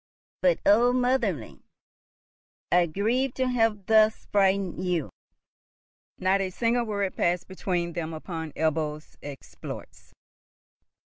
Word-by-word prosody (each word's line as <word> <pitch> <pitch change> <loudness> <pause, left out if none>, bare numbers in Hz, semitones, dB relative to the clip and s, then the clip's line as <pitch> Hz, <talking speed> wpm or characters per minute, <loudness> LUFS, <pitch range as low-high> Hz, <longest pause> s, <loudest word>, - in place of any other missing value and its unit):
But - - +3
oh, 235 +4 +5
motherling! 250 - 0 1.1
I 175 -1 +4
grieve 235 +10 0
to 260 -1 0
have 225 -5 +1
thus 220 0 +4
frightened 195 -2 +1
you." 175 -5 -1 1.1
Not 190 +1 +2
a 190 - -1
single 235 +5 0
word 200 -3 -2
passed 175 0 0
between 175 -2 -2
them 165 -1 -4
upon 160 0 -6
Ebbo's 155 -1 -2
exploits. 90 - -10
190 Hz, 105 wpm, -26 LUFS, 165-225 Hz, 1.1 s, oh